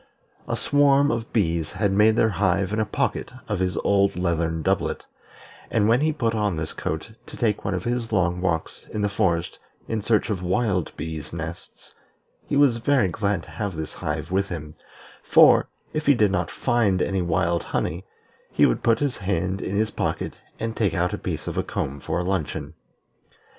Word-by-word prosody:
A - - -1
swarm 145 0 +4
of 115 -1 -3
bees 85 -7 0
had 100 -2 +1
made 105 +3 +4
their 110 - +3
hive 95 0 +1
in 110 - 0
a 110 - +2
pocket - - -1 0.2
of 105 -4 -1
his 90 -1 0
old 100 -1 +3
leathern 85 -2 -1
doublet; - - 0 0.6
and 110 -2 +2
when 120 +4 +4
he 155 +1 +3
put 115 -7 -1
on 105 -4 0
this 80 0 -4
coat 80 +7 -4 0.2
to - - -10
take 110 -3 0
one 95 - -1
of 90 - -3
his 120 -1 -2
long 90 -3 +1
walks 80 -3 -2
in 105 - -3
the 105 - +2
forest 85 -4 0 0.3
in 110 -1 -2
search 110 +1 +1
of 95 -3 -2
wild 90 -1 0
bees' 75 -1 -5
nests, 85 0 -8 0.5
he - - -1
was 140 -4 +5
very 120 -4 +2
glad 100 -3 -1
to - - -13
have 100 -4 -3
this 80 -1 -5
hive 75 +2 -4
with 95 +1 +1
him, 75 -3 -6 0.5
for, - - +6 0.2
if 155 -1 -3
he 145 - +7
did 105 -4 +3
not 90 -2 0
find 115 -7 +1
any 95 -1 0
wild 85 0 +1
honey, 85 +4 -2 0.5
he - - +4
would - - +1
put 115 -1 +3
his 140 +1 -1
hand 95 -1 -1
in 95 - -3
his 110 +1 +1
pocket - - -3 0.2
and 115 0 -3
take 100 -7 +1
out 90 +1 0
a - - -1
piece - - -4
of - - -2
a - - +1
comb 70 +2 -3
for 80 - -2
a - - -1
luncheon. 90 -5 -2
95 Hz, 195 wpm, -24 LUFS, 85-110 Hz, 0.6 s, he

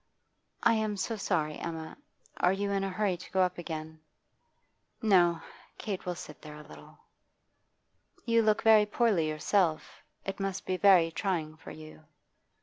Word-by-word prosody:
'I - - +5
am 215 -2 -1
so 225 +4 -2
sorry, 155 -7 -1
Emma. 160 -1 -6 0.4
Are 180 - +3
you 200 +1 -2
in 195 -1 0
a 195 - -1
hurry 190 -1 -1
to 180 - -13
go 190 - +2
up 180 -1 -2
again?' 160 -2 -6 1.0
'No. 175 -7 +3 0.3
Kate 195 -4 -5
will 180 - -2
sit - - -10
there 150 -1 -10
a 150 - -11
little.' - - -15 1.3
'You 230 -1 +3
look 215 -1 +2
very 215 -2 +6
poorly 210 -8 +1
yourself. 155 0 0 0.2
It 195 - -4
must 195 -1 -3
be 185 - -1
very 180 -4 +5
trying 160 -3 -2
for 155 - -12
you. 155 0 -12
185 Hz, 155 wpm, -30 LUFS, 160-205 Hz, 1.3 s, very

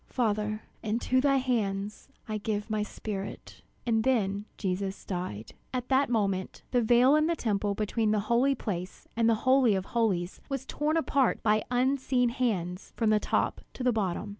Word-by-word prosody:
Father, 215 -3 -1 0.2
into 235 +4 +1
thy 275 0 +3
hands 210 -5 -1 0.2
I 215 -1 -2
give 210 0 -3
my 215 -1 +1
spirit!" 205 -1 -6 0.2
And 225 -2 +2
then 205 -5 +1
Jesus 190 0 -3
died. 175 - -4 0.2
And - - -5
at - - -34
that 270 0 +3
moment, 195 -5 -1
the 245 - +3
veil 245 +5 +5
in 305 +1 +3
the 335 - +1
Temple 205 -6 -1
between 215 +1 0
the 210 -1 +2
Holy 240 +6 +2
Place 185 -6 -5
and 230 0 +3
the 225 +1 0
Holy 255 -5 +5
of 190 -1 -2
Holies, 195 -7 -1
was 275 -2 -3
torn 305 +2 0
apart 280 -5 +1
by 215 -1 +3
unseen 255 0 +2
hands 200 -8 -2
from 225 -2 +2
the 215 - +4
top - - 0
to 255 - -5
the 250 -1 +3
bottom. 200 -3 -1
220 Hz, 175 wpm, -29 LUFS, 200-250 Hz, 0.2 s, veil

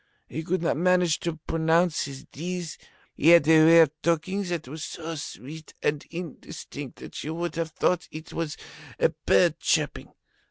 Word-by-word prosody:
He 160 - -5
could 170 +2 -1
not 165 - +1
manage 180 -1 +3
to 170 -2 -3
pronounce 165 +1 +2
his 135 0 -8
Ds. 175 +1 -6 0.3
He 150 - 0
had 170 -3 +7
a 160 -1 +7
way 165 +1 +8
of 155 -4 +4
talking 170 +4 0
that 170 -6 -3
was 155 +4 -7
so 165 0 -6
sweet 155 0 -8
and 145 -1 0
indistinct 160 -5 -8
that - - -8
you 155 +2 -4
would 170 +1 -3
have 165 -1 -2
thought 180 +2 0
it 155 +1 -9
was 165 -3 -3 0.4
a - - +4
bird - - +2
chirping. - - 0
165 Hz, 170 wpm, -26 LUFS, 155-170 Hz, 0.4 s, way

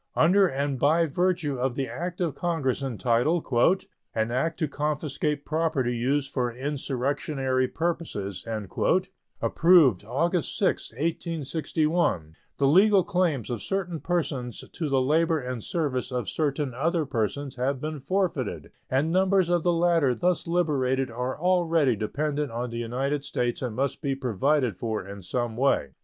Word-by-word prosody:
Under 195 +3 +5
and 140 -2 -2
by 160 +5 +4
virtue 165 -3 0
of 125 -1 0
the 135 -1 -1
act 175 0 -5
of 165 -5 0
Congress 160 -7 -1
entitled 130 +5 +1 0.7
"An 110 +1 0
act 155 +6 0
to 155 - 0
confiscate 150 0 -2
property 155 -6 0
used 135 +4 0
for 125 -3 0
insurrectionary 135 0 -1
purposes," 155 - -3 1.0
approved 160 - +5
August 165 - 0
6, - - 0
1861, 155 - -1 0.2
the 140 - +2
legal 190 +6 +5
claims 170 - 0
of 115 -4 -3
certain 180 - -2
persons 145 -10 -2
to 160 -3 -3
the 135 -1 +3
labor 160 +5 +2
and 125 -4 -5
service 140 -6 -2
of 125 -4 -2
certain 145 -3 -1
other 160 +5 0
persons 130 +3 -2
have 130 +2 0
become 155 +1 -4
forfeited, 140 - -2 0.2
and 140 +5 +1
numbers 190 0 +3
of 175 -1 +2
the 175 - +2
latter 165 -6 +3
thus 175 +8 0
liberated 135 -7 +1
are 125 +3 -3
already 165 -7 +3
dependent 145 +6 -2
on 120 +1 -3
the 115 - -4
United 135 +5 -2
States 120 -3 -2
and 125 -4 -3
must 135 0 -1
be 140 -3 -1
provided 130 -1 +1
for 110 -4 -3
in 100 0 -8
some 120 +5 -2
way. 120 - +1
140 Hz, 145 wpm, -26 LUFS, 125-165 Hz, 1.0 s, Under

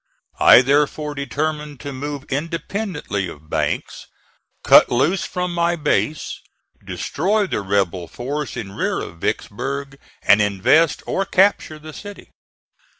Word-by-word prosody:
I 125 - +8
therefore 150 +2 +1
determined 150 +1 -3
to 145 -1 -6
move 140 +1 -5
independently 165 - -3
of 80 -2 -12
Banks, - - -2 0.6
cut - - +7
loose 175 +10 +1
from 180 -1 -3
my 170 0 +1
base, 150 -1 -1 0.4
destroy 205 +7 -1
the 185 - -2
rebel 95 -3 -1
force 140 - -5
in 95 -4 -5
rear - - -1
of 85 - -8
Vicksburg 140 +5 -3 0.2
and 105 - +5
invest 105 - +3
or 195 - 0
capture 190 -5 +2
the 155 0 -11
city. 205 +4 -10
145 Hz, 125 wpm, -21 LUFS, 120-165 Hz, 0.6 s, I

